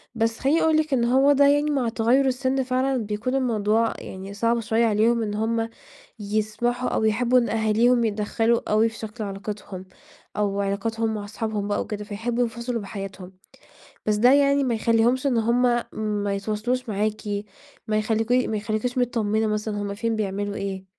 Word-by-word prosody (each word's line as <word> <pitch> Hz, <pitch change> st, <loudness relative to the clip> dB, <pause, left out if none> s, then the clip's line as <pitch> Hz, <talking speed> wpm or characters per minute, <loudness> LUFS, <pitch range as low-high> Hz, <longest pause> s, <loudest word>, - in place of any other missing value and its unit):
بس 225 Hz, 0 st, 0 dB
خلّيني 295 Hz, +5 st, +2 dB
أقول 320 Hz, -1 st, +3 dB
لِك 310 Hz, -2 st, 0 dB
إنه 240 Hz, 0 st, +2 dB
هو 280 Hz, +2 st, +5 dB
ده 280 Hz, 0 st, +5 dB
يعني 290 Hz, +1 st, +3 dB
مع 255 Hz, -5 st, 0 dB
تغير 235 Hz, +4 st, +2 dB
السن 260 Hz, 0 st, 0 dB
فعلًا 260 Hz, +1 st, 0 dB
بيكون 215 Hz, +5 st, -2 dB
الموضوع 225 Hz, -3 st, +1 dB
يعني 190 Hz, +1 st, -8 dB
صعب 230 Hz, +3 st, +1 dB
شوية 225 Hz, +1 st, +1 dB
عليهم 225 Hz, +2 st, +2 dB
إن 210 Hz, -1 st, -3 dB
هم 225 Hz, +1 st, -1 dB, 0.5 s
يسمحوا 215 Hz, +4 st, -1 dB
أو -, -, -1 dB
يحبوا 245 Hz, +3 st, +3 dB
إن 235 Hz, -, -1 dB
أهاليهم 225 Hz, +2 st, +2 dB
يتدخلوا 225 Hz, +2 st, +1 dB
أوي 220 Hz, +2 st, +4 dB
في 225 Hz, -, -12 dB
شكل 220 Hz, 0 st, -6 dB
علاقتهم 200 Hz, -1 st, -6 dB, 0.5 s
أو 200 Hz, -1 st, 0 dB
علاقاتهم 220 Hz, +3 st, -1 dB
مع 205 Hz, -1 st, -4 dB
أصحابهم 215 Hz, -1 st, -3 dB
بقى 205 Hz, -, 0 dB
وكده، 210 Hz, -1 st, -5 dB
فيحبوا 230 Hz, +4 st, -2 dB
ينفصلوا 235 Hz, 0 st, -3 dB
بحياتهم، 195 Hz, -2 st, -8 dB, 0.7 s
بس 210 Hz, -1 st, +2 dB
ده 245 Hz, +5 st, +5 dB
يعني 280 Hz, 0 st, +4 dB
ما 240 Hz, -3 st, 0 dB
يخلّيهمش 235 Hz, +4 st, +2 dB
إن 245 Hz, -4 st, +1 dB
هم 235 Hz, +2 st, +2 dB, 0.6 s
ما 200 Hz, -1 st, -1 dB
يتواصلوش 220 Hz, +5 st, -2 dB
معاكِ 210 Hz, +1 st, -1 dB, 0.7 s
ما 215 Hz, -, +1 dB
يخليكِ 220 Hz, +2 st, 0 dB
ما 245 Hz, -4 st, +2 dB
يخليكيش 215 Hz, +4 st, -2 dB
متطمنة 220 Hz, -3 st, +1 dB
مثلًا 210 Hz, -1 st, -2 dB
هم 200 Hz, 0 st, -3 dB
فين، 230 Hz, +2 st, -2 dB
بيعملوا 205 Hz, -1 st, -2 dB
إيه. 195 Hz, -1 st, -4 dB
225 Hz, 170 wpm, -24 LUFS, 210-245 Hz, 0.7 s, هو